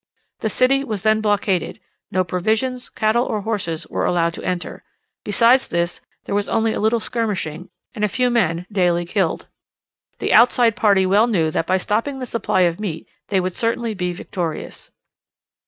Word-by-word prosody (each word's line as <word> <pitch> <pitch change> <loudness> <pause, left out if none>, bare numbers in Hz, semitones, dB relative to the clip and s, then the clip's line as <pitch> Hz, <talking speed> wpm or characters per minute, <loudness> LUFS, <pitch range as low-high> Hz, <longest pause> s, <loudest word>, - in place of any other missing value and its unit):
The 220 - -1
city 270 +5 +2
was 215 -7 -4
then 220 0 +3
blockaded, 205 -2 0 0.3
no 185 0 +1
provisions, 220 +8 -1
cattle 220 +3 +1
or 215 -4 -2
horses, 195 -7 -3
were - - -3
allowed 170 -1 +1
to - - -8
enter; 180 -1 -4 0.4
besides 235 +5 +4
this, 170 +1 -2 0.2
there - - -4
was 205 0 0
only 225 -1 +1
a - - -3
little 220 +2 +2
skirmishing, 195 -8 -3 0.2
and 215 -4 -4
a - - +4
few 250 +5 +1
men 180 -7 +1
daily 175 -3 +1
killed. 185 -1 -1 0.7
The - - 0
outside 235 -1 +5
party 205 -5 +3
well 205 +5 +4
knew 165 -9 +1
that 165 - -1
by 185 - +3
stopping 230 +9 -1
the 260 - -4
supply 225 -5 0
of 175 0 +2
meat 175 -7 -5 0.2
they 195 - +1
would 185 0 -2
certainly 230 +1 -1
be 180 -3 -2
victorious. 175 -2 -5
205 Hz, 170 wpm, -21 LUFS, 180-230 Hz, 0.7 s, outside